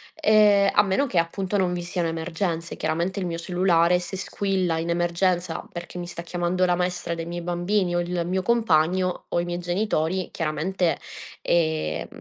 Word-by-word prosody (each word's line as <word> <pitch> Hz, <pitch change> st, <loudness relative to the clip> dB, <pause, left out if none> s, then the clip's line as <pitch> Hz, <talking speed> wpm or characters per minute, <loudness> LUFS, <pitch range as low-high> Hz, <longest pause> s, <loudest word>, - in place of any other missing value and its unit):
ehm, 210 Hz, -8 st, +5 dB
a -, -, +6 dB
meno 200 Hz, +9 st, +1 dB
che, 185 Hz, -8 st, +2 dB
appunto, 190 Hz, +4 st, -1 dB
non 185 Hz, -2 st, +1 dB
vi 175 Hz, -1 st, -3 dB
siano 175 Hz, -1 st, -2 dB
emergenze; 165 Hz, +1 st, -3 dB
chiaramente 170 Hz, +5 st, -1 dB
il 190 Hz, -, -2 dB
mio 170 Hz, -1 st, -3 dB
cellulare 175 Hz, 0 st, +2 dB
se 180 Hz, +2 st, -6 dB
squilla 185 Hz, -3 st, -1 dB
in 165 Hz, +1 st, -3 dB
emergenza, 175 Hz, 0 st, 0 dB
perché 175 Hz, +1 st, -7 dB
mi 175 Hz, -, -5 dB
sta 170 Hz, -1 st, -6 dB
chiamando 175 Hz, +1 st, 0 dB
la 180 Hz, -, +2 dB
maestra 175 Hz, -1 st, -2 dB
dei 165 Hz, -, -5 dB
miei 175 Hz, +1 st, -5 dB
bambini, 175 Hz, +1 st, 0 dB
o 175 Hz, -, +2 dB
il 175 Hz, 0 st, -2 dB
mio 185 Hz, +1 st, 0 dB
compagno, 185 Hz, -5 st, +2 dB
o -, -, +1 dB
i 175 Hz, -, -1 dB
miei 175 Hz, 0 st, -3 dB
genitori, 180 Hz, -1 st, -1 dB
chiaramente, 165 Hz, +3 st, -1 dB, 0.4 s
ehm, 160 Hz, -, 0 dB
175 Hz, 175 wpm, -24 LUFS, 170-185 Hz, 0.4 s, a